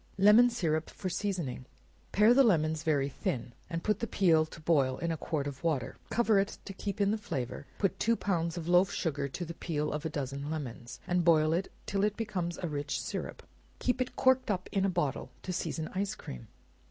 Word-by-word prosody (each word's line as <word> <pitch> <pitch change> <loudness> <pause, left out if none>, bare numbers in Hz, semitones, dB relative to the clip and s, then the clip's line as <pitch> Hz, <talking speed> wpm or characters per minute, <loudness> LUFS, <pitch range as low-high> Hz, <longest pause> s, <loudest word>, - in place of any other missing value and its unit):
Lemon 210 +5 +7
Syrup 160 -9 -1
for 185 - -5
Seasoning. 170 -11 -3 0.4
Pare 210 +4 +6
the 275 - +6
lemons 160 -8 +2
very 150 -4 +1
thin, 125 -3 -3 0.2
and 165 -2 -3
put 210 - +1
the 230 - -2
peel 165 -7 +3
to 160 - -11
boil 140 -5 +2
in 170 0 -1
a - - 0
quart 155 -2 -2
of 140 -2 -6
water; 155 -7 0
cover 225 -3 +3
it, 195 +2 -1
to 195 - -6
keep 200 +1 -4
in 200 0 +3
the 220 - -1
flavor; 135 - -4
put 195 - 0
two 230 +1 +3
pounds 170 -5 -1
of 165 -1 -5
loaf 180 +2 +5
sugar 145 -5 -1
to 175 +6 -5
the 170 - -6
peel 150 -3 -2
of 150 0 -3
a 160 - -1
dozen 140 0 -4
lemons, 125 -6 -5
and 180 0 +1
boil 160 -2 +4
it 180 +3 -1
till 200 0 0
it 210 0 +1
becomes 185 -6 -2
a - - +1
rich 145 -2 -2
syrup; - - -5 0.3
keep 250 0 0
it 255 - -2
corked 260 -1 +3
up 185 -3 -1
in 195 -1 +1
a - - +2
bottle, 160 -7 -1
to 185 - -3
season 160 -2 -2
ice 195 +2 -1
cream. 60 -2 -9
170 Hz, 215 wpm, -31 LUFS, 150-200 Hz, 0.4 s, Lemon